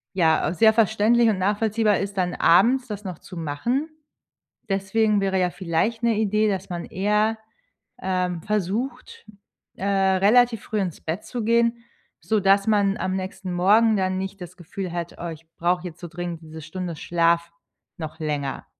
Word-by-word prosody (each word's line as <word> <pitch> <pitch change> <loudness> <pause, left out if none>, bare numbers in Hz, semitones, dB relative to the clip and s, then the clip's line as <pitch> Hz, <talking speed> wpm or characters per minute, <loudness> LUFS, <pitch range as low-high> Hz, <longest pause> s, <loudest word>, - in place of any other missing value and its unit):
Ja, 160 -5 +3
auch 160 - -1
sehr 220 +3 +5
verständlich 225 +2 +3
und 205 -4 0
nachvollziehbar 210 +2 +1
ist 200 0 -4
dann 180 -1 0
abends 250 +9 +4
das 210 -1 -6
noch 185 -4 -6
zu 180 - -12
machen. 205 - -2 0.8
Deswegen 205 +2 +1
wäre 195 -1 0
ja 180 -1 +2
vielleicht 185 +6 -1
'ne 230 -2 +2
Idee, 215 0 +2
dass 190 -3 -2
man 175 -1 -4
eher, 210 +3 +1 0.7
ähm, 180 -2 -1
versucht, 215 - -3 0.5
äh, 195 - -6
relativ 200 +4 +3
früh 215 -1 -2
ins 180 -5 -3
Bett 165 +5 -4
zu 240 -3 -4
gehen, 235 +1 +2 0.3
sodass 200 -2 +2
man 205 -2 +2
am 185 0 -2
nächsten 190 -1 -5
Morgen 210 +5 +4
dann 185 -1 0
nicht 190 0 -5
das 180 +1 -9
Gefühl 180 +2 -6
hat: 170 -1 -5
„Oh, 170 - -5
ich 165 0 -9
brauche 175 +1 0
jetzt 170 -1 -9
so 175 - -7
dringend 175 0 -6
diese 160 0 -10
Stunde 170 +1 -5
Schlaf 170 0 +1 0.4
noch 160 -2 -7
länger.” 145 -4 -3
190 Hz, 165 wpm, -24 LUFS, 175-215 Hz, 0.8 s, sehr